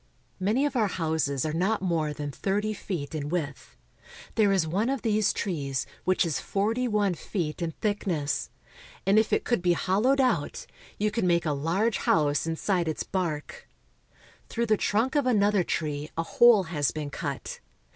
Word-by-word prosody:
Many 215 +9 +2
of 290 -2 -2
our 220 -4 +3
houses 160 -6 -1
are 155 - -2
not 190 +7 +1
more 165 -4 0
than 145 -1 -5
thirty 205 +7 -1
feet 175 -8 -5
in 145 -2 -3
width. 150 -5 -4 0.6
There 210 -3 +3
is 190 -4 +2
one 200 +9 0
of 270 -3 -2
these 215 -2 +2
trees 140 -8 -2 0.2
which 185 -1 +3
is 160 -4 -1
forty 225 +5 0
one 210 -4 +1
feet 170 -2 -4
in 165 -1 -2
thickness, 180 -9 -1 0.6
and 195 +3 +5
if 220 - 0
it - - +2
could 240 -6 0
be 175 -1 +3
hollowed 210 +11 +2
out, 235 - 0 0.3
you 210 +1 0
could 220 -2 -1
make 170 -1 +2
a 155 - +1
large 180 +10 0
house 150 0 +2
inside 170 +2 0
its 160 - -2
bark. 185 - -4 0.8
Through 235 0 -1
the 215 -1 +3
trunk 220 +6 +1
of 290 -4 +2
another 205 -5 +3
tree 150 -3 -2
a 165 - +1
hole 235 +3 +5
has 150 -6 0
been 145 +3 -5
cut. - - -5
185 Hz, 175 wpm, -27 LUFS, 155-215 Hz, 0.8 s, and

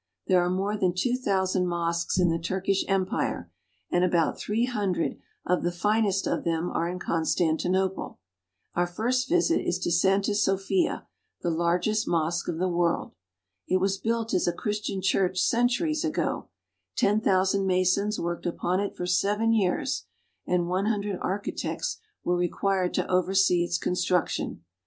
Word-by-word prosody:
There 180 -1 +4
are 175 - 0
more 195 +3 -1
than 185 -4 0
two 245 +7 +1
thousand 190 -6 0
mosques 170 0 -1
in 180 -2 +4
the 165 - 0
Turkish 190 +3 0
Empire, 185 - -1 0.4
and 175 - +2
about 170 -3 +2
three 225 +3 0
hundred 200 -8 -1 0.3
of 180 0 +1
the 175 - 0
finest 200 +2 +1
of - - -1
them 165 +1 -1
are 170 +1 -1
in 180 - -4
Con 165 -2 -1
stantinople. 180 +4 0 0.6
Our 175 0 +1
first 245 +8 -1
visit 345 -1 +3
is 175 - -1
to 185 -1 -2
Santa 195 +4 +2
Sophia, 205 - +1 0.4
the 175 - +1
largest 175 +6 +1
mosque 170 +1 0
of 160 - -2
the 185 +2 0
world. 175 -1 0 0.6
It 185 - +3
was 195 +1 0
built 225 +1 -1
as 185 - +2
a 175 - +2
Chris 210 +4 -2
tian 195 -2 -4
church 185 -1 +1
centuries 245 - +1
ago; 315 -1 -1 0.5
ten 210 +2 +2
thousand 195 -1 +2
masons 185 +3 +1
worked 170 +1 -3
upon 175 +2 -1
it 200 0 -3
for 180 - -3
seven 205 +5 +2
years, 195 -5 0 0.4
and 175 -1 +1
one 185 +3 0
hundred 205 -3 -1
architects 200 - -3 0.2
were 175 - +1
required 180 +1 0
to - - 0
oversee 185 -1 +3
its 175 0 -1
construction. 180 - -1
185 Hz, 160 wpm, -27 LUFS, 175-205 Hz, 0.6 s, There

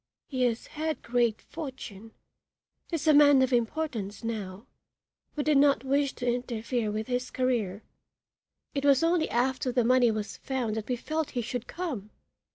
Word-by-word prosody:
"He 260 -3 -3
has 235 -1 -1
had 310 -2 -3
great 235 -2 +1
fortune 255 -9 -8 0.8
is 330 -2 -2
a 310 - +7
man 285 -2 +7
of 260 0 0
importance 230 -5 -1
now 210 -2 -4 0.7
we 295 - -1
did 300 -1 +3
not 280 -3 +4
wish 275 +1 +1
to 245 - -6
interfere 240 -1 -1
with 215 +1 -2
his 250 +1 -2
career. 225 -6 -1 0.9
It 275 - -2
was 280 0 +5
only 335 -1 +2
after 255 +2 0
the 245 -1 +2
money 250 0 +5
was 215 -1 -3
found 255 -5 -2
that 220 -1 -4
we 250 - +1
felt 310 +4 -2
he 240 - +1
should 245 +1 -4
come. 275 - -4
250 Hz, 165 wpm, -28 LUFS, 225-280 Hz, 0.9 s, a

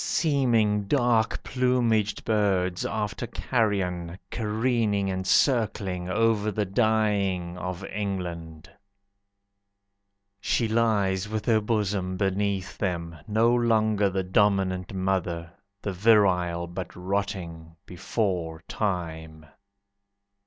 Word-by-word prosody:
Seeming 115 -9 +2
dark 120 -2 +1
plumaged 120 -5 +1
Birds, 95 -4 +1
after 110 +1 -3
carrion, 95 -9 -1
Careening 110 -3 0
and 95 0 -3
circling, 100 -9 +1
Over 110 +1 +2
the 105 +1 -1
dying 100 -4 +1
Of 90 +2 -5
England. 90 -6 -5 1.7
She 115 +2 0
lies 105 -4 +1
with 110 -1 -3
her 110 -2 +3
bosom 100 -4 -1
Beneath 95 0 -1
them, 85 -3 -2
no 110 +3 +3
longer 110 -4 +2
The 95 0 -1
Dominant 95 -1 +1
Mother, 90 -3 -2 0.3
The 100 - -2
Virile 90 -4 +3
but 85 +1 -7
rotting 90 -3 -4
Before 90 -3 -2
time. 80 -6 -3
100 Hz, 95 wpm, -26 LUFS, 90-110 Hz, 1.7 s, her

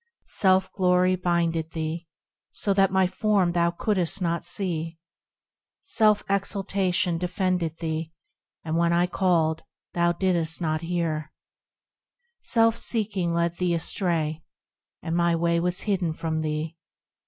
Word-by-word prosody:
Self 190 -1 +2
glory 185 -1 +3
blinded 170 -2 -1
thee, 160 +1 -4 0.5
so 200 - 0
that 195 -1 +4
my 190 0 +3
Form 190 -1 +1
thou 170 0 +2
couldst 185 +1 -1
not 170 -2 -1
see: 170 -3 -2 0.9
Self 215 -2 +3
exultation 195 -3 0
deafened 180 +1 0
thee, 160 -1 -3 0.5
and 160 0 -2
when 170 0 +2
I 175 +1 +3
called, 170 -3 +1 0.3
thou 170 0 +2
didst 170 -2 0
not 155 -2 -1
hear; 165 -3 -2 1.1
Self 230 -1 +2
seeking 200 -6 -1
led 170 0 0
thee 180 -2 +1
astray, 165 -2 -1 0.6
and 165 0 -2
my 170 -1 +2
Way 170 0 +1
was 180 +1 -1
hidden 190 -6 -1
from 160 0 -2
thee. 155 +1 -3
175 Hz, 125 wpm, -25 LUFS, 165-185 Hz, 1.1 s, that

